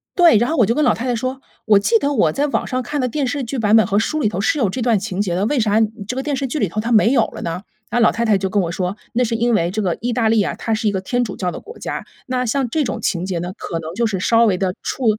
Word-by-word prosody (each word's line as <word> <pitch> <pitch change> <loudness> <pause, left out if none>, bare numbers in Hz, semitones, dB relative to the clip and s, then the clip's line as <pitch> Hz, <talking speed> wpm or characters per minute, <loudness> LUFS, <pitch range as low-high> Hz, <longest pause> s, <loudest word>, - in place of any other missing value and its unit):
对， 345 - +6
然 240 +3 +1
后 325 - -1
我 235 - +5
就 230 - +1
跟 305 - +2
老 - - +4
太 235 - -5
太 245 -2 0
说： 255 +3 -3 0.3
“我 210 -2 +5
记 455 - +3
得 285 -6 0
我 205 - +3
在 290 - 0
网 280 - -1
上 255 -1 -1
看 290 +3 -3
的 255 - +1
电 275 +2 -1
视 270 +2 -2
剧 250 +2 -4
版 215 -1 +3
本 220 - +5
和 200 - +1
书 310 +8 -1
里 220 - +2
头 195 -2 -3
是 220 +9 +1
有 220 -7 +2
这 245 +7 -4
段 230 -3 +2
情 195 -1 -3
节 180 -4 -1
的， 190 +3 0
为 275 +4 +1
啥 215 -1 +2 0.3
这 250 - -3
个 265 - -2
电 290 -1 -1
视 270 0 -2
剧 300 +4 -3
里 205 - +1
头 215 +5 -2
它 230 - -3
没 225 0 +5
有 - - +4
了 - - -9
呢？” 170 +2 -3 0.3
那 240 +1 +1
老 225 - +5
太 235 +2 -1
太 215 -3 +3
就 190 0 -2
跟 205 +1 +1
我 170 - -2
说， 180 +3 -3 0.2
那 245 +2 +2
是 230 - -1
因 235 +1 +1
为 170 -4 +1
这 215 +3 -2
个 180 -4 -1
意 245 +1 -1
大 230 -1 +1
利 220 -2 +3
啊， - - -2
它 225 - -2
是 220 0 +1
一 - - 0
个 195 - -1
天 245 +6 -1
主 210 -5 -6
教 180 -2 -2
的 - - -7
国 460 +3 -12
家， - - -5 0.2
那 255 0 -1
像 250 +2 0
这 305 +5 0
种 250 - -3
情 175 -1 -1
节 185 -3 -2
呢， 175 +2 -5
可 165 - -4
能 160 +1 -7
就 235 +3 +1
是 205 -4 -1
稍 230 +5 +3
微 195 -5 +2
地 185 -1 -1
触 260 - -3
225 Hz, 365 characters per minute, -19 LUFS, 195-255 Hz, 0.3 s, 对